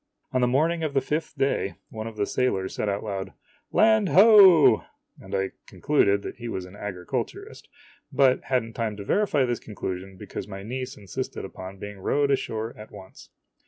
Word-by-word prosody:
On 130 -2 +1
the 125 - +3
morning 160 +7 +1
of 155 -3 -2
the - - +5
fifth 150 +2 -3
day, 135 -9 0
one 110 0 -6
of 110 -1 -9
the 100 - +1
sailors 95 -6 -1
said 105 - -2
out 100 0 -2
loud, 95 -2 -5 0.4
"Land 220 -3 +4
hoe!" 195 -5 +7 0.4
and - - -6
I 95 0 -1 0.2
concluded 100 -9 +1
he 120 - -6
was 95 -5 -4
an 90 +2 -13
agriculturist, 95 -4 -5 0.4
but 130 -2 +3
had 130 -2 +1
n't 115 - -9
o - - -4
time 110 -2 -2
to 100 - -7
verify 155 - +2
this 120 -1 -2
conclusion 95 -2 -6
because 100 +1 -7
my 95 -1 -8
niece 125 +4 -5
insisted 100 -3 -5
upon 95 +1 -9
being 105 0 -8
rowed 140 +8 +1
ashore 115 -4 -2
at 105 0 -11
once. 95 -2 -13
110 Hz, 185 wpm, -25 LUFS, 100-140 Hz, 0.4 s, hoe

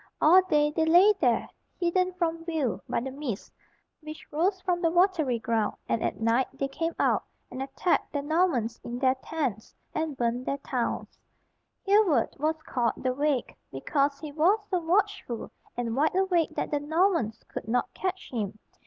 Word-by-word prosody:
All 355 +5 +7
day 300 -5 +2
they 320 +1 +1
lay 355 +6 +6
there, 245 -5 +2 0.3
hidden 365 +1 +1
from 330 -2 -1
view 315 -8 -1
by - - 0
the 265 +2 -4
mists 265 -7 -5 0.5
which 310 0 -9
rose 370 +6 +1
from 360 -2 0
the 335 - +3
watery 340 -7 +2
ground, 225 -2 0
and 230 - 0
at - - -2
night 230 +3 +2
they 275 - -2
came 330 +4 -3
out, - - +2 0.3
and 255 +1 -5
attacked 275 +6 0
the 285 -1 -2
Normans 290 -8 +1
in 240 +1 -5
their 260 0 +3
tents, 265 -10 -3 0.2
and 315 -3 -2
burned 240 +1 -1
their 275 - 0
towns. 255 -4 -3 0.7
Hereward 390 - +3
was 310 +2 +1
called 235 -3 0
"the 255 0 -1
Wake" 285 -1 0 0.2
because 280 - 0
he 305 -2 -7
was 325 +8 +3
so 365 - +2
watchful 355 - -1 0.3
and 230 -2 -2
wide 305 +6 +2
awake 370 -4 +1
that - - -2
the 295 - +1
Normans 315 - +1
could - - -7
not 245 +2 0
catch 375 0 -4
him. 215 -4 -3
300 Hz, 170 wpm, -28 LUFS, 245-345 Hz, 0.7 s, All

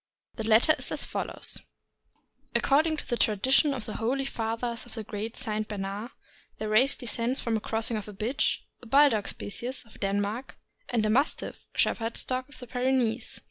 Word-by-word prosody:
The 220 - -4
letter 225 +7 +5
is - - -3
as - - +3
follows: - - -3 0.9
According 310 +3 +3
to - - -6
the 240 -2 0
tradition 260 +8 +4
of 255 -5 -4
the 215 - -5
holy 265 +4 0
fathers 230 -1 -2
of 240 - -6
the 220 - -4
great 215 +2 -5
St. 215 -3 -2
Bernard, 205 +2 -4 0.5
their 215 - -3
race 245 +6 +4
descends 245 0 -1
from 230 - -1
the 220 - +2
crossing 225 +1 +1
of 210 - -6
a 210 - -8
bitch 230 +8 0 0.2
(a 245 - -12
Bulldog 270 -4 +5
species) 240 +6 -3
of 225 - -17
Den 200 0 +1
mark 215 +6 -3 0.3
and 230 -3 +1
a - - +2
Mastiff 275 +7 0
(Shepherd's 225 0 +1
dog) 255 +1 -2
of 290 - -15
the 250 - -9
Pyrenees. 245 -2 0
230 Hz, 180 wpm, -28 LUFS, 215-255 Hz, 0.9 s, letter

